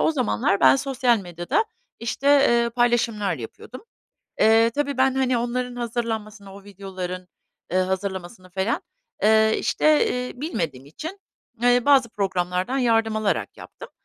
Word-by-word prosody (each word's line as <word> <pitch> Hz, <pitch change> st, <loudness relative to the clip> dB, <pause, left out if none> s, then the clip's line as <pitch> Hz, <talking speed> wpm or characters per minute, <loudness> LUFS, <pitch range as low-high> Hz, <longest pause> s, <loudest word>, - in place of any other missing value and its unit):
o -, -, +3 dB
zamanlar 250 Hz, -6 st, 0 dB
ben -, -, +6 dB
sosyal 260 Hz, -3 st, +1 dB
medyada, 175 Hz, -, -2 dB, 0.3 s
işte, 235 Hz, +4 st, -4 dB
eee, 240 Hz, -5 st, +4 dB
paylaşımlar 230 Hz, -5 st, +1 dB
yapıyordum. 135 Hz, -, -10 dB, 0.6 s
Eee, 225 Hz, +1 st, +5 dB
tabii 285 Hz, -2 st, -1 dB
ben, 265 Hz, 0 st, +3 dB
hani, 260 Hz, -2 st, +1 dB
onların 245 Hz, +1 st, -3 dB
hazırlanmasını, 225 Hz, -4 st, -4 dB
o 200 Hz, 0 st, -13 dB
videoların, 185 Hz, -2 st, -7 dB, 0.5 s
ııı, 185 Hz, 0 st, +3 dB
hazırlamasını 190 Hz, 0 st, -5 dB
falan, 190 Hz, +5 st, -1 dB, 0.4 s
eee, 220 Hz, +1 st, +4 dB
işte, 305 Hz, -1 st, +2 dB, 0.2 s
iii, 250 Hz, -, -12 dB
bilmediğim 155 Hz, -, -3 dB
için, 320 Hz, -, -8 dB, 0.4 s
eee, 245 Hz, 0 st, +3 dB
bazı 270 Hz, -4 st, +4 dB
programlardan 185 Hz, +3 st, -2 dB
yardım 225 Hz, -3 st, +2 dB
alarak 215 Hz, -2 st, -1 dB
yaptım -, -, -11 dB
225 Hz, 130 wpm, -23 LUFS, 190-250 Hz, 0.6 s, ben